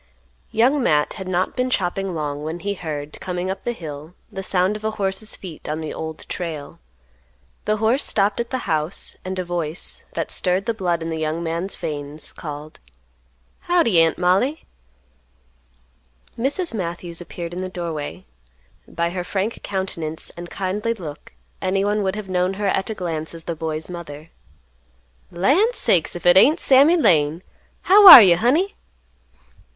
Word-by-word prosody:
Young 260 +6 +2
Matt 150 -9 +2
had 190 -3 -7
not 185 0 -1
been 255 0 0
chopping 195 -4 -1
long 145 -2 -3
when 160 +3 -5
he 200 0 -2
heard, 150 -5 -6
coming 180 0 -3
up 190 - -7
the 240 - -1
hill, 155 -4 -8 0.2
the 195 - -5
sound 190 +1 +1
of 210 - -8
a 220 - 0
horse's 195 +2 -2
feet 175 -6 -9
on 155 +1 -2
the 155 -1 -5
Old 160 0 -6
Trail. 160 -5 -6 0.9
The 215 0 +1
horse 225 +6 +1
stopped 200 +1 +1
at 235 0 -2
the 260 -2 -3
house 155 0 -2
and 185 0 -5
a 185 - -2
voice, 170 -1 -4
that - - -3
stirred 185 +1 0
the 230 - 0
blood 175 -5 -1
in 165 - -4
the 160 - -3
young 160 +2 -2
man's 170 +4 -2
veins, 145 0 -4
called, 150 0 -8 0.8
"Howdy, 320 - +3
Aunt 165 -1 +2
Mollie." 190 - +1 1.7
Mrs. 280 +7 -2
Matthews 175 -3 -4
appeared 175 -1 -7
in 180 - -4
the 185 - -4
doorway; 170 -1 -5 0.6
by 170 +1 -2
her 180 0 -3
frank 195 +5 -3
countenance 170 -5 -4
and 175 0 -8
kindly 205 +5 -2
look 155 - -9 0.3
anyone 200 +3 0
would 190 0 -1
have 210 -2 -6
known 185 +1 0
her 205 +1 -3
at 195 +1 0
a 220 - -3
glance 165 -3 -4
as 165 - -8
the 170 - -4
boy's 160 0 -4
mother. 165 -3 -9 1.0
"Land 350 - +2
sakes, 175 -2 +2
if 175 - -8
it 175 +1 +7
ain't 300 - +6
Sammy 280 +6 +5
Lane! 165 - +2 0.4
How 400 +2 +7
are 260 - +14
you, 175 -3 +5
honey?" 300 - +2
180 Hz, 165 wpm, -21 LUFS, 160-210 Hz, 1.7 s, are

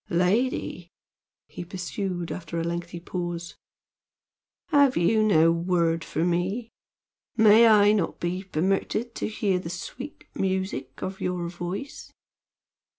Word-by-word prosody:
"Lady!" 180 0 0 0.6
he - - -8
pursued, 180 0 -4
after 170 -1 -4
a - - -1
lengthy 170 0 -4
pause, 175 -1 -5 1.1
"have 285 -4 +4
you 215 +6 +3
no 165 -6 +5
word 170 -1 +1
for 165 +1 -1
me? 190 +7 -1 0.7
May 220 +1 +7
I 210 -2 +6
not 205 -6 0
be 175 +2 -2
permitted 195 +6 -1
to - - -3
hear 205 -3 0
the 165 - -6
sweet 245 - -7
music 190 -9 -3
of 190 +1 -5
your 180 -1 -2
voice?" 180 +9 -6
180 Hz, 120 wpm, -26 LUFS, 170-210 Hz, 1.1 s, May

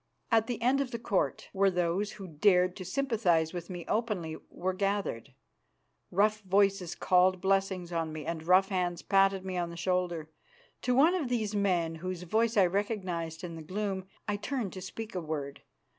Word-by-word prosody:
At 225 -1 +4
the 240 -3 -3
end 265 +3 +3
of 275 - -2
the 235 - -4
Court, 195 - -1
where 195 0 +4
those 180 +3 0
who 200 -2 -8
dared 180 +2 +3
to 190 - -6
sympathise 190 - +1
with 175 -1 -6
me 175 -2 -6
openly 210 -8 -1
were 185 +1 -2
gathered, 195 - -2 0.7
rough 215 +3 +2
voices 195 -2 +2
called 185 0 +3
blessings 190 -2 0
on 165 -2 -1
me 155 -2 -6
and 165 0 -3
rough 185 +4 +4
hands 180 -3 -1
patted 195 -1 +3
me 185 -1 -3
on 175 -1 -1
the 170 - -8
shoulder. 175 -3 -1 0.5
To 250 - +1
one 310 +7 +6
of 320 -9 -1
these 220 -4 -1
men 180 -5 +1
whose 180 +1 -5
voice 220 +5 +1
I 195 - +7
recognised 180 -4 -2
in 170 -2 -5
the 165 - -7
gloom 190 +2 -3 0.2
I 205 -1 0
turned 215 -1 -3
to 185 - -7
speak 220 +4 -7
a 180 - -2
word. 150 -3 -4
185 Hz, 185 wpm, -30 LUFS, 175-210 Hz, 0.7 s, I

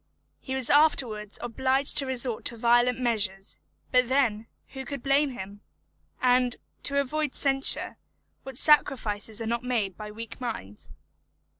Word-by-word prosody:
He 265 - -5
was 260 -2 -1
afterwards 245 -9 +2
obliged 265 +3 +2
to 275 - -3
resort 250 -3 0
to 235 - -2
violent 240 +2 +3
measures; 205 -6 -1 0.3
but 250 -1 +3
then, 230 -5 +1 0.2
who 265 -1 -7
could 275 0 -7
blame 280 +1 +2
him? 205 -4 -9 0.6
And, 250 -1 +2 0.3
to 280 0 0
avoid 295 +1 -2
censure, 270 -1 +1 0.4
what 265 -2 -9
sacrifices 225 -7 +1
are - - -5
not 235 +2 -2
made 225 -7 -1
by 210 +1 -8
weak 225 +3 -9
minds? 105 - -7
245 Hz, 140 wpm, -27 LUFS, 220-270 Hz, 0.6 s, violent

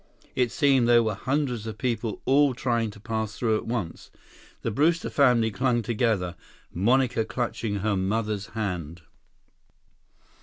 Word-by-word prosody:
It 125 -2 +1
seemed 135 -5 +3
there 120 -1 +6
were 110 -1 0
hundreds 125 0 -2
of 110 - -6
people 115 -4 -2
all 140 -1 +4
trying 115 -2 0
to 100 - -12
pass 110 0 -3
through 110 -3 +1
at - - -7
once. 115 -8 -4 0.5
The 115 - -1
Brewster 160 +8 +1
family 120 -5 +3
clung 120 +1 +1
together, 105 -6 0 0.4
Monica 120 +5 +2
clutching 115 -2 -3
her 105 0 +1
mother's 105 +2 -1
hand. 90 -6 -4
115 Hz, 140 wpm, -26 LUFS, 105-125 Hz, 0.5 s, there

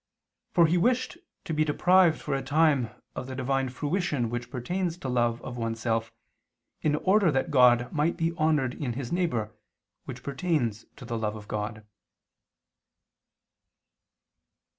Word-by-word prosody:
For 170 -2 +5
he 170 +2 +2
wished 255 - +1 0.3
to 160 - -3
be 155 0 +2
deprived 175 +2 +4
for 145 - -3
a 135 - 0
time 145 -3 +2 0.3
of 125 - -5
the 130 - -6
Divine 135 0 0
fruition 145 - -1
which 120 0 -4
pertains 175 +8 -2
to 140 - -6
love 120 -2 +1
of 125 -1 -6
one 115 -1 -2
self, 115 0 -1 0.7
in 150 -1 +2
order 190 +2 +3
that 135 +4 -1
God 125 -3 +5
might 155 +2 +1
be 165 0 0
honored 150 -6 +1
in 130 -4 -3
his 125 0 -5
neighbor, 140 -12 -1 0.5
which 125 -1 -8
pertains 135 - -1
to 125 - -11
the 115 -1 -3
love 105 -1 -2
of 105 -1 -10
God. 105 0 -4
135 Hz, 150 wpm, -27 LUFS, 120-165 Hz, 0.7 s, For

